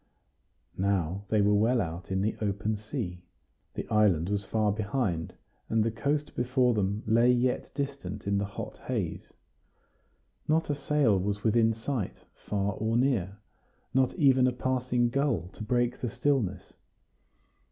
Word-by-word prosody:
Now 95 Hz, 0 st, 0 dB
they 110 Hz, -1 st, +3 dB
were 105 Hz, +1 st, +4 dB
well 115 Hz, +4 st, +3 dB
out 85 Hz, -2 st, -4 dB
in 95 Hz, 0 st, +1 dB
the 110 Hz, -, 0 dB
open 105 Hz, +1 st, -1 dB
sea. 105 Hz, -5 st, -5 dB, 0.5 s
The -, -, -4 dB
island 100 Hz, -6 st, +3 dB
was 100 Hz, 0 st, -1 dB
far 105 Hz, +1 st, +1 dB
behind, 100 Hz, -5 st, -2 dB, 0.3 s
and 110 Hz, -1 st, +3 dB
the 115 Hz, -, 0 dB
coast 145 Hz, +6 st, -2 dB
before 125 Hz, 0 st, +2 dB
them 105 Hz, 0 st, -1 dB
lay 115 Hz, +3 st, +4 dB
yet 125 Hz, 0 st, 0 dB
distant 135 Hz, -9 st, -4 dB
in 100 Hz, 0 st, +1 dB
the 100 Hz, -, -1 dB
hot 100 Hz, -, -7 dB
haze. -, -, -3 dB, 1.2 s
Not 160 Hz, 0 st, +2 dB
a -, -, 0 dB
sail 140 Hz, -8 st, +2 dB
was 100 Hz, +2 st, -2 dB
within 115 Hz, 0 st, +4 dB
sight, 115 Hz, -2 st, -4 dB
far 100 Hz, -1 st, -2 dB
or 110 Hz, +3 st, 0 dB
near 110 Hz, -7 st, +1 dB, 0.6 s
not 130 Hz, -1 st, +2 dB
even 130 Hz, -6 st, +5 dB
a -, -, +2 dB
passing 125 Hz, 0 st, 0 dB
gull 125 Hz, -, 0 dB
to 110 Hz, -, -9 dB
break 120 Hz, +1 st, 0 dB
the 125 Hz, -, -1 dB
stillness. 110 Hz, -8 st, -1 dB
110 Hz, 150 wpm, -29 LUFS, 100-125 Hz, 1.2 s, even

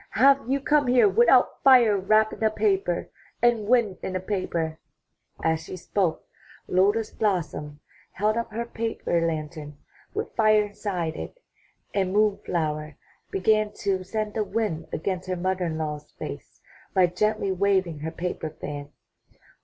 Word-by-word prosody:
''Have 270 Hz, +1 st, +4 dB
you 275 Hz, +1 st, +2 dB
come 290 Hz, 0 st, +2 dB
here 245 Hz, +8 st, +5 dB
without 470 Hz, +4 st, +4 dB
fire 245 Hz, -6 st, +6 dB
wrapped 215 Hz, +3 st, +3 dB
in -, -, -6 dB
a 220 Hz, -, +5 dB
paper, 390 Hz, -, 0 dB, 0.3 s
and 235 Hz, -3 st, +2 dB
wind 225 Hz, -6 st, +3 dB
in 185 Hz, -, -4 dB
a -, -, 0 dB
paper?'* 175 Hz, -5 st, -2 dB, 0.6 s
As 160 Hz, 0 st, +2 dB
she 185 Hz, -, -7 dB
spoke, 180 Hz, -1 st, -1 dB, 0.4 s
Lotus 205 Hz, +4 st, +2 dB
blossom 155 Hz, -8 st, -2 dB, 0.3 s
held 210 Hz, +3 st, +1 dB
up 235 Hz, -1 st, -3 dB
her 230 Hz, +2 st, -3 dB
paper 225 Hz, -7 st, -2 dB
lantern 155 Hz, -2 st, -5 dB, 0.4 s
with -, -, -4 dB
fire 215 Hz, -1 st, +4 dB
inside 190 Hz, -5 st, -3 dB
it, -, -, -7 dB, 0.6 s
and 190 Hz, -2 st, 0 dB
Moon 210 Hz, -1 st, +3 dB
flower 155 Hz, -3 st, -2 dB, 0.3 s
began 215 Hz, +2 st, +2 dB
to 195 Hz, -3 st, 0 dB
send 215 Hz, +2 st, -3 dB
the 220 Hz, -, 0 dB
wind 205 Hz, -7 st, -2 dB
against 185 Hz, +2 st, -3 dB
her 185 Hz, -, 0 dB
mother 185 Hz, +1 st, -1 dB
in 160 Hz, -1 st, -3 dB
law's 150 Hz, -1 st, -4 dB
face -, -, -8 dB, 0.3 s
by 185 Hz, -1 st, +6 dB
gently 200 Hz, +3 st, 0 dB
waving 190 Hz, -4 st, +1 dB
her 155 Hz, +2 st, -3 dB
paper 165 Hz, -1 st, -4 dB
fan. 145 Hz, -2 st, -7 dB
195 Hz, 150 wpm, -25 LUFS, 165-220 Hz, 0.6 s, fire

